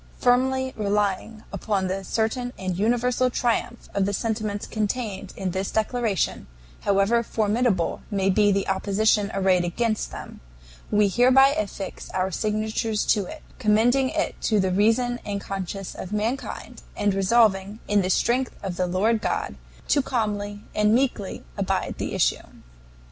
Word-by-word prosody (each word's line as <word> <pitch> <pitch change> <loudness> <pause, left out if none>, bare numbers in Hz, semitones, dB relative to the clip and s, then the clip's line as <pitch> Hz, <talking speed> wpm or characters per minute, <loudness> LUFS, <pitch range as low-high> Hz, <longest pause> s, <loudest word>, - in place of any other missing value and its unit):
"Firmly 260 +1 +2
relying 210 +1 -1
upon 200 -3 -1
the 190 +1 -2
certain 235 +5 -1
and 185 -1 -3
universal 245 +5 +2
triumph 240 -1 -1
of 200 -1 +1
the 200 - -1
sentiments 215 -1 -2
contained 210 -3 -3
in 190 -2 -2
this 190 +2 -2
declaration, 220 -2 -1 0.3
however 200 +4 +2
formidable 215 -4 0
may 195 -3 0
be 205 +1 +4
the 195 0 0
opposition 200 +2 +2
arrayed 190 -2 +2
against 215 +5 -1
them, - - -9 0.5
we 210 0 +4
hereby 255 +6 +5
affix 205 -7 -4
our 185 0 0
signatures 215 +2 -1
to 205 -3 +2
it; 315 - -9 0.2
commending 245 +4 +3
it 315 +2 -2
to 215 -2 +2
the 190 -1 +1
reason 230 +5 +2
and 200 -1 -3
conscience 195 -1 -5
of 185 - -8
mankind, 220 +6 -3 0.2
and 205 -1 +2
resolving, 195 0 +3
in 205 -1 +3
the 185 - -1
strength 250 +6 +1
of 185 -3 -4
the 180 - +1
Lord 210 +5 +1
God, - - -1 0.4
to 285 - +4
calmly 205 -5 -2
and 210 +1 +3
meekly 245 -6 -1 0.2
abide - - -1
the - - -3
issue." - - +2
210 Hz, 145 wpm, -24 LUFS, 195-235 Hz, 0.5 s, hereby